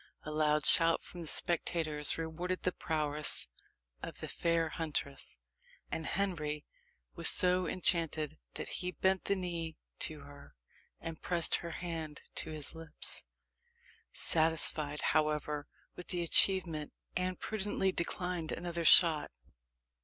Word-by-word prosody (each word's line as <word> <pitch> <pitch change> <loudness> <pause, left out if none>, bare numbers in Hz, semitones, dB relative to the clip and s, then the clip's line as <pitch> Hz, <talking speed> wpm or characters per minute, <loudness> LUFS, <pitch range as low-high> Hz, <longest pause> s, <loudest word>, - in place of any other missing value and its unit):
A 155 - -6
loud 150 -1 +1
shout 165 -1 +7
from 175 - -9
the 165 - -8
spectators 155 -3 +1
rewarded 170 +3 -4
the 185 - +1
prowess 150 - -1 0.5
of - - -8
the - - -6
fair 165 -1 0
huntress; 145 - -3 0.5
and 160 - -3
Henry 155 -6 -2 0.5
was - - +5
so 180 0 +4
enchanted, 160 -4 0 0.2
that - - -4
he 180 - -3
bent 190 +1 0
the 200 - +1
knee 170 -4 -5 0.2
to 155 -2 0
her, 140 - -15 0.4
and 165 -1 -8
pressed 170 -2 +2
her 170 - -7
hand 165 -3 -6
to - - -2
his 155 -2 -5
lips. 165 -1 -7 0.9
Satisfied, 155 -2 +2
however, 150 -1 -1 0.3
with 180 - -9
the' 175 -1 -2
achievement, 170 -3 +3 0.2
Anne 185 0 -1
prudently 205 -1 -2
declined 175 -1 -3
another 170 -1 -3
shot. 165 -2 +7
165 Hz, 125 wpm, -32 LUFS, 150-180 Hz, 0.9 s, shout